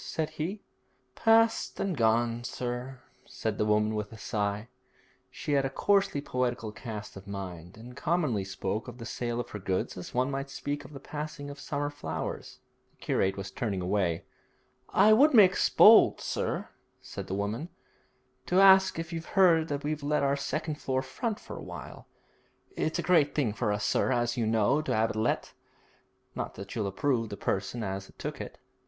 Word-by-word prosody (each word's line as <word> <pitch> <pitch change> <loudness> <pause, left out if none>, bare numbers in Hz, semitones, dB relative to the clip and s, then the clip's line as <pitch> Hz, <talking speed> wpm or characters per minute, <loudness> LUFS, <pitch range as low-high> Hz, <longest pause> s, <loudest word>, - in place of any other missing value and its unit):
said 160 -1 -3
he. 190 +7 -4 0.5
'Past 225 - +3
and 195 -3 -1
gone, 115 0 +2
sir,' 125 +1 -5 0.2
said - - -4
the 105 - +2
woman 105 +1 +2
with 105 0 -3
a 110 - -10
sigh. 105 -1 -2 0.6
She - - -5
had 140 -1 +3
a 135 - 0
coarsely 195 +1 +2
poetical 125 -5 -2
cast 110 -1 -7
of 95 0 -11
mind, 95 -2 -7
and 120 +2 -11
commonly 150 - 0
spoke 95 +3 -3
of 125 -1 -8
the 115 - -8
sale 120 +1 -3
of 120 - -5
her 105 - -5
goods 95 -1 -2
as 90 - -7
one 130 +2 0
might 135 0 -3
speak 145 +1 -4
of 145 - -13
the 135 - -8
passing 150 -1 -6
of 140 - -10
summer 145 0 -3
flowers. 80 - -5 0.3
The - - -37
curate 95 +1 0
was 95 0 -5
turning 100 -2 -2
away. 90 -2 0 0.6
'I 215 - +6
would 280 +5 +6
make 195 -4 +7 0.2
bold, 220 +1 +8
sir,' - - -2 0.3
said - - -8
the 95 - -2
woman, 105 - -3 0.8
'to 180 - +3
ask 190 -2 +7
if 165 +1 -5
you've 165 +4 -7
heard 165 -4 +5
that 145 -2 -3
we've 150 0 -2
let 145 0 +1
our 140 0 +2
second 150 +2 -3
floor 130 0 0
front 215 - -3
for - - -9
a - - -7
while. - - -9 0.7
It's 160 - -1
a 170 - -2
great 160 -4 +3
thing 130 -8 +1
for 110 -1 -1
us, 105 0 -1
sir, - - +2
as 120 -1 +1
you 115 -3 0
know, 115 +6 +3
to 155 - -1
'ave 110 +1 +2
it - - -7
let, 110 +2 -1 0.8
not - - -5
that 100 +1 -8
you'll 110 -4 -1
approve 115 +3 0
the 100 - -6
person 100 +5 -2
as 95 -1 -4
'as - - -17
took - - -5
it.' - - -8
125 Hz, 190 wpm, -29 LUFS, 105-155 Hz, 0.8 s, bold